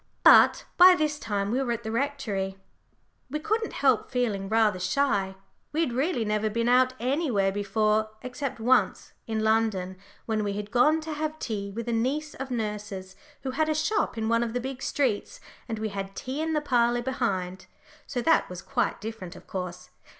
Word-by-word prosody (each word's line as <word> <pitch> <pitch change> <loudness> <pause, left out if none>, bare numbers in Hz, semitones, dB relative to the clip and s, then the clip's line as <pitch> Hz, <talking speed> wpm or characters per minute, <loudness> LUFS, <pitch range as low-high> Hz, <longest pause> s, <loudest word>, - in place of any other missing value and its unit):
But - - +7
by 365 +1 +9
this 305 -3 -1
time 205 -4 -2
we 255 +3 +1
were 250 -3 -1
at 235 0 -5
the 220 - -4
Rectory. 225 -7 -2 0.7
We 300 - -2
couldn't 435 +7 -1
help 265 -5 +2
feeling 215 -6 -1
rather 215 -3 +3
shy; 200 -4 0 0.4
we 315 - +1
had 265 -8 0
really 260 -2 0
never 210 +1 0
been 230 +2 -1
out 255 +1 +4
anywhere 250 - +1
before 215 +2 +1
except 255 0 -4
once, 250 +3 +2
in 220 -1 -1
London, 215 -4 +1 0.3
when 220 -2 0
we 200 -1 -1
had 205 +1 -5
gone 300 +6 +4
to 315 0 -5
have 310 +1 -3
tea 205 -8 -4
with 230 +4 -6
a 235 - 0
niece 280 +7 -1
of 270 - -6
nurse's, 210 -5 -4 0.3
who 265 - -2
had 310 +4 0
a 310 - +1
shop 310 - 0
in 220 0 -1
one 230 +1 +2
of 235 -1 -2
the 245 - 0
big 265 +1 -6
streets, 275 - -1 0.3
and 225 - -2
we 215 0 -2
had 195 -1 -6
tea 265 +4 -4
in 320 0 -1
the 300 - +1
parlour 240 -3 +2
behind. 190 -8 -2 0.4
So 245 -3 -3
that 325 +4 +3
was 180 0 -8
quite 250 -3 -1
different, 215 -5 -7
of - - -13
course. 180 -2 -6
235 Hz, 190 wpm, -27 LUFS, 205-275 Hz, 0.7 s, by